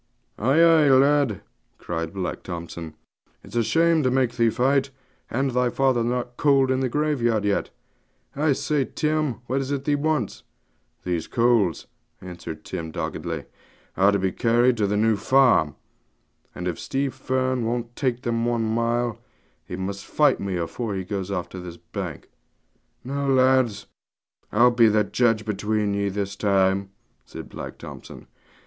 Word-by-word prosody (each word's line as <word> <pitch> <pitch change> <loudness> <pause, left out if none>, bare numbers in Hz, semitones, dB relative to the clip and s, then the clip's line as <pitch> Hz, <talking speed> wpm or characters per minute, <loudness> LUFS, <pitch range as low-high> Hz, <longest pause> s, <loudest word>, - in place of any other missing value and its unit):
'Ay, 130 +8 +3
ay, 165 -3 +6
lad,' 135 -5 +4 0.4
cried 80 -1 -4
Black 95 -1 -4
Thompson; 85 -2 -7 0.5
'it's - - -12
a 120 - +3
shame 165 +6 +3
to 130 - +2
make 130 -2 +1
thee 115 -1 +3
fight, 135 +4 +1 0.4
and 135 +2 0
thy 125 0 +1
father 130 -2 +1
not 120 +1 -2
cold 135 -2 +3
in 130 - +1
the 130 -1 0
graveyard 120 -7 0
yet. 100 -1 0 0.7
I 145 +1 +2
say, 145 0 0
Tim, 155 -5 -1
what 130 +3 -1
is 135 - -5
it 140 -1 -2
thee 145 - +1
wants?' 145 -6 -1 0.6
'These 85 -3 -2
coals,' 115 - +2 0.3
answered 90 -1 -8
Tim 80 -1 -5
doggedly, 80 - -4 0.5
'are 100 +2 +4
to 100 - +2
be 95 -1 0
carried 120 +3 +3
to 105 -2 +1
the 105 +1 0
New 110 0 +3
Farm; 125 - +3 0.8
and 90 - -4
if 85 - -3
Stevie 135 +1 -1
Fern 130 -1 -1
won't 120 +1 -3
take 125 -3 -1
them 115 -1 -1
one 120 -1 0
mile, 115 +1 0 0.4
he 90 - -7
must 100 +2 -5
fight 150 -1 +3
me 95 -2 -2
afore 100 +5 -3
he 95 - -3
goes 95 0 -4
off 95 -3 -3
this 90 -2 -8
bank.' - - -7 0.8
'Now, 140 +2 -3
lads, 130 -4 +3 0.7
I'll 120 +4 +5
judge 110 0 +3
between 105 0 -1
ye 100 0 0
this 100 0 -3
time,' 95 -1 +1 0.3
said - - -10
Black - - -8
Thompson. - - -10
120 Hz, 155 wpm, -24 LUFS, 100-130 Hz, 0.8 s, ay